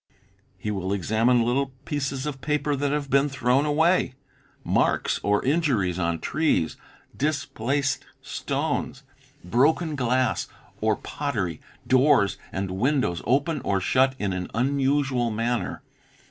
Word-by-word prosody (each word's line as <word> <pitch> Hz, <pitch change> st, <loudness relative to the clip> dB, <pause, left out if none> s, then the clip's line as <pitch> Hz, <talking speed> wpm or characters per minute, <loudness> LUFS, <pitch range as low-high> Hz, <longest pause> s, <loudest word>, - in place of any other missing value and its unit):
He 105 Hz, +3 st, -3 dB
will 95 Hz, -1 st, -2 dB
examine 110 Hz, +5 st, +2 dB
little 135 Hz, +2 st, 0 dB
pieces 135 Hz, -2 st, -2 dB
of 140 Hz, -3 st, -5 dB
paper 150 Hz, 0 st, 0 dB
that 140 Hz, +1 st, -1 dB
have 145 Hz, -2 st, -2 dB
been 140 Hz, +2 st, +4 dB
thrown 135 Hz, +2 st, +1 dB
away, 160 Hz, -2 st, +2 dB, 0.5 s
marks -, -, +1 dB
or 105 Hz, +2 st, +1 dB
injuries 130 Hz, -, +1 dB
on 85 Hz, -1 st, 0 dB
trees, 155 Hz, -, 0 dB, 0.4 s
displaced 140 Hz, -2 st, -1 dB, 0.2 s
stones, -, -, -3 dB, 0.2 s
DUTIES -, -, -30 dB
3 90 Hz, -, -13 dB
broken 155 Hz, +5 st, +3 dB
glass 130 Hz, -1 st, +1 dB, 0.3 s
or -, -, +2 dB
pottery, 110 Hz, -, -3 dB, 0.2 s
doors 130 Hz, -6 st, +4 dB
and 95 Hz, -1 st, -3 dB
windows 115 Hz, -, 0 dB
open 145 Hz, +3 st, +1 dB
or 100 Hz, -1 st, +1 dB
shut 130 Hz, +7 st, +2 dB
in 100 Hz, -5 st, -1 dB
an 90 Hz, -1 st, -4 dB
unusual 135 Hz, -1 st, +1 dB
manner. 115 Hz, +2 st, -2 dB
130 Hz, 130 wpm, -25 LUFS, 105-145 Hz, 0.5 s, been